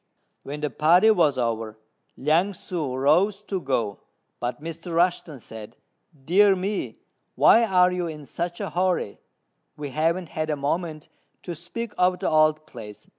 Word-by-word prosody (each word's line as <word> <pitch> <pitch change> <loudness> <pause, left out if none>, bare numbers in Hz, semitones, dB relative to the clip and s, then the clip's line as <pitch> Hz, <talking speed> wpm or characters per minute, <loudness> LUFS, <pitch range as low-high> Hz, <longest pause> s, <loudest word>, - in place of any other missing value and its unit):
When 145 +2 -7
the 150 -2 -2
partie 175 - +5
was 155 -9 +3
over 115 -3 -2 0.4
Liang 165 +8 +2
ssŭ 155 -8 -4
rose 190 +9 +2
to 195 -3 -3
go, 115 - -1 0.4
but 120 +3 -3
Mr. 165 +3 -7
Rushten 170 -3 +1
said, 110 0 -10 0.5
"Dear 195 +4 +5
me! 195 +2 -3 0.4
why 230 - +6
are 180 -3 +4
you 180 -1 -2
in 150 -2 -8
such 175 +4 -4
a - - -4
hurry; 180 - -1 0.6
we 145 -1 -5
haven't 165 +5 -1
had 155 0 -3
a 150 - +1
moment 155 +2 -3 0.4
to 175 - -5
speak 205 +8 -6
of 180 0 +3
the 190 - -1
old 155 0 +3
place. 110 -7 -11
160 Hz, 155 wpm, -24 LUFS, 140-180 Hz, 0.6 s, why